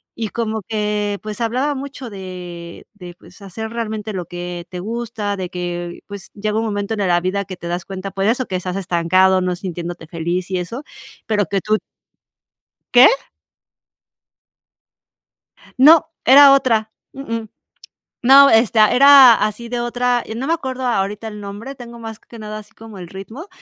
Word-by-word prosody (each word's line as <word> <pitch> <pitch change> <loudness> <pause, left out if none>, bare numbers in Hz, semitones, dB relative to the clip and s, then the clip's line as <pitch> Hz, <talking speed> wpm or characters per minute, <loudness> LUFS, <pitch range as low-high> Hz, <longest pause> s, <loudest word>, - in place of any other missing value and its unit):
y 225 -2 -4
como 220 -1 -3
que, 210 -2 -1
pues, 215 +1 -6
hablaba 255 +6 0
mucho 275 -2 -7
de 180 -3 -9
de, 180 -4 -11
pues, 185 - -18
hacer 210 +3 -7
realmente 220 -2 -4
lo 180 -2 -4
que 175 0 -7
te 180 - -7
gusta, 215 -1 -4
de 180 -2 -5
que, 175 -1 -5
pues, 200 -1 -9
llega 210 +1 -2
un 225 - -2
momento 205 0 -2
en 210 - -7
e 195 - 0
la 175 -1 +2
vida 195 +2 -2
que 185 - -8
te 170 - -8
das 175 0 -3
cuenta 195 0 -6
por 195 +1 -2
eso, 245 +4 +1
que 185 - -4
estás 180 0 -5
estancado, 185 +1 +2
no 180 -1 -1
sintiéndote 175 -2 -6
feliz 175 +3 -3
y 185 - 0
eso, 230 +11 -6 0.4
pero 210 -2 0
que 195 +2 -2
tú 215 0 +1 1.2
¿Qué? 250 +1 +9 2.7
No, 315 +5 +7 0.2
era 275 +2 +8
otra. 225 -5 +1 0.2
Uh-uh. 230 -5 -5 0.7
No, 275 +3 +8
esta 225 -1 +4
era 275 -2 +8
así, 215 +2 -2
de 245 0 -3
otra 245 0 0
yo 220 - -6
no 250 +4 -4
me 325 - +1
acuerdo 260 -5 -4
ahorita 210 -2 -1
el 210 -1 -9
nombre, 205 +7 -8
tengo 235 -3 -11
más 225 -1 -8
que 235 - -15
nada 215 0 -7
así 215 +1 -16
como 220 -3 -12
el 175 - -8
ritmo, 195 - -10
210 Hz, 175 wpm, -19 LUFS, 185-235 Hz, 2.7 s, Qué